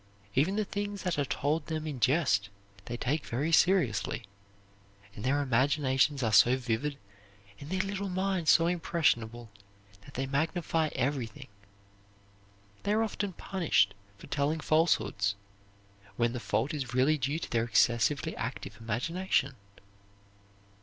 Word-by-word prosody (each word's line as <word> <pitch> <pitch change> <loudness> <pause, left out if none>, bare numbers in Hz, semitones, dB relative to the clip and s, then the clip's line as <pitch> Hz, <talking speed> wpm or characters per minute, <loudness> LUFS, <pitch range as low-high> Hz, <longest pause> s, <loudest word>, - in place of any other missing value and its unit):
Even 155 - +2
the 215 0 0
things 205 0 -4
that 180 -5 -1
are 145 - +1
told 145 +3 -1
them 155 -1 -3
in 145 -5 -4
jest 125 - +2 0.4
they 120 - -5
take 145 +5 -1
very 140 +8 -2
seriously; 145 - +2 0.9
and 100 - -9
their 140 +3 +1
imaginations 135 +1 +2
are 110 -2 0
so 120 +5 +6
vivid 130 +4 -2 0.6
and 140 - -9
their 185 +1 0
little 200 0 -3
minds 185 -2 0
so 165 - +6
impressionable 120 -10 0 0.5
that - - -15
they 135 - -1
magnify 160 +3 0
everything. 135 0 -2 1.3
They 205 - 0
are 220 +1 +3
often 205 -3 -3
punished 165 - +1 0.2
for - - -12
telling 150 +2 -1
falsehoods, 155 - +1 0.8
when 120 0 +1
the 125 - -3
fault 110 +7 -1
is 130 -5 -4
really 145 +4 +3
due 140 +4 -1
to - - -6
their 115 -1 +1
excessively 120 +6 +2
active 115 -3 -5
imagination. 140 - 0
145 Hz, 135 wpm, -30 LUFS, 120-165 Hz, 1.3 s, so